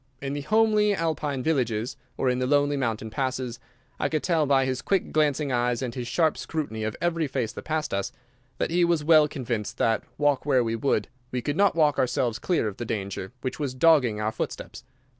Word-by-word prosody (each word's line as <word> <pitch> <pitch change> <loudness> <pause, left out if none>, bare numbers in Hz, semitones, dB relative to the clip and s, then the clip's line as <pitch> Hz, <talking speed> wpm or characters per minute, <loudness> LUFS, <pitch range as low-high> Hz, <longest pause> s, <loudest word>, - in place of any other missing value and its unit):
In 135 0 -4
the 145 - -3
homely 215 +3 +3
Alpine 150 -6 -2
villages 125 -5 0 0.2
or 130 - 0
in 125 0 +1
the 130 - 0
lonely 145 +1 +3
mountain 115 -5 -2
passes, 130 0 -2 0.4
I 145 - 0
could 155 0 -1
tell 165 -5 +2
by 135 -1 +3
his 130 0 -2
quick 195 +2 0
glancing 150 -2 +1
eyes 120 0 0
and 120 -2 -3
his 125 -1 -5
sharp 160 +3 +1
scrutiny 140 -9 -4
of 110 0 -2
every 165 -2 0
face 125 -5 -2
that - - -9
passed 155 -5 -2
us, 100 0 -1 0.5
that - - -1
he 175 +1 +3
was 170 -3 +2
well 155 -1 +6
convinced 120 -7 -4
that, 115 -1 +1
walk 145 -2 +2
where 130 -4 +3
we 115 0 -1
would, 115 -3 0 0.2
we 125 -1 -3
could 145 - -1
not 200 0 +3
walk 150 -3 +3
ourselves 120 -2 0
clear 170 -11 0
of 100 - -5
the - - -4
danger 100 -3 -4
which 130 +2 -4
was 140 -4 -2
dogging 130 -7 +4
our 110 +1 0
footsteps. 110 - -5
135 Hz, 210 wpm, -26 LUFS, 120-155 Hz, 0.5 s, well